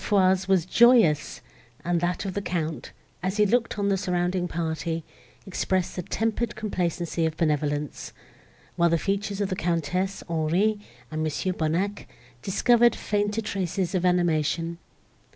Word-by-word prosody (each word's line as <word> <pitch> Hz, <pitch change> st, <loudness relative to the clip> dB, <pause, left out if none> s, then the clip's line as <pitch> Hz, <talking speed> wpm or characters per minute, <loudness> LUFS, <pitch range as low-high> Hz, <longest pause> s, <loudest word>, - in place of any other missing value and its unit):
Foix's 190 Hz, -2 st, +3 dB
was 190 Hz, -4 st, +3 dB
joyous, 210 Hz, -, +4 dB, 0.4 s
and 170 Hz, -1 st, +1 dB
that 180 Hz, +3 st, -1 dB
of 190 Hz, -, -3 dB
the 200 Hz, -, -2 dB
Count, 165 Hz, -4 st, -3 dB, 0.3 s
as 190 Hz, +3 st, -2 dB
he 210 Hz, -, +5 dB
looked 230 Hz, +2 st, +1 dB
on 200 Hz, -1 st, +1 dB
the 195 Hz, -, +2 dB
surrounding 180 Hz, -1 st, 0 dB
party, 165 Hz, -1 st, -3 dB, 0.4 s
expressed 185 Hz, -1 st, -1 dB
the 180 Hz, -, -2 dB
tempered 225 Hz, +5 st, -2 dB
complacency 175 Hz, -5 st, -2 dB
of 160 Hz, -1 st, -1 dB
benevolence; 150 Hz, -2 st, -1 dB, 0.7 s
while 170 Hz, 0 st, +4 dB
the 170 Hz, -, +3 dB
features 200 Hz, +3 st, -2 dB
of 200 Hz, -, 0 dB
the 185 Hz, -, -1 dB
Countess, 175 Hz, +3 st, -1 dB
Henri, 170 Hz, +6 st, +1 dB, 0.3 s
and 155 Hz, 0 st, -3 dB
Mons. 155 Hz, -2 st, -2 dB
Bonnac, 175 Hz, +6 st, -1 dB, 0.3 s
discovered 235 Hz, -, +4 dB
fainter 205 Hz, +1 st, -1 dB
traces 190 Hz, -3 st, -2 dB
of 185 Hz, -2 st, 0 dB
animation. 170 Hz, -1 st, +1 dB
180 Hz, 140 wpm, -26 LUFS, 165-200 Hz, 0.7 s, he